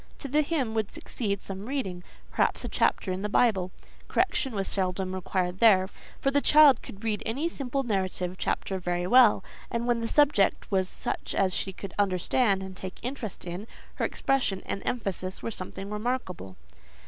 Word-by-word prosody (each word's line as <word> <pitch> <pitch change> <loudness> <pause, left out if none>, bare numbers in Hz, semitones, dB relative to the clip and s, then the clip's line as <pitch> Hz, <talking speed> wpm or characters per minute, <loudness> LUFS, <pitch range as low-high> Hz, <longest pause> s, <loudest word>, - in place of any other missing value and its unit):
To 280 - -6
the 295 +3 +3
hymn 285 -7 -1
would 220 -2 0
succeed 200 -4 -2
some 195 +2 -6
reading—perhaps 195 -10 -2
a - - -4
chapter 190 - +1
in 185 +1 -3
the 210 - -2
Bible; 195 -5 +2 0.4
correction 265 -5 0
was 195 -1 -1
seldom 185 -1 -1
required 185 -1 -1
here, 190 -5 +6 0.3
for 275 - +1
the 285 +1 +3
child 295 -5 +7
could 200 - -11
read 215 -2 -1
any 270 +9 -1
simple 275 -4 -2
narrative 185 -5 -1
chapter 190 -1 -1
very 175 0 -1
well; 240 +2 +6 0.3
and, 235 0 -2
when 240 -1 +2
the 230 - -2
subject 285 -9 +3
was 190 -1 +2
such - - -4
as 190 -2 +2
she 195 - -1
could 190 0 -8
understand 195 +2 +2
and 190 -1 -8
take 185 0 -7
an 245 - -3
interest 245 -10 -7
in, 180 +5 -6 0.3
her - - +1
expression 255 -8 0
and 195 - -3
emphasis 190 -5 -2
were 230 - -2
something 195 0 -6
remarkable. 210 - -3
200 Hz, 175 wpm, -28 LUFS, 185-245 Hz, 0.4 s, child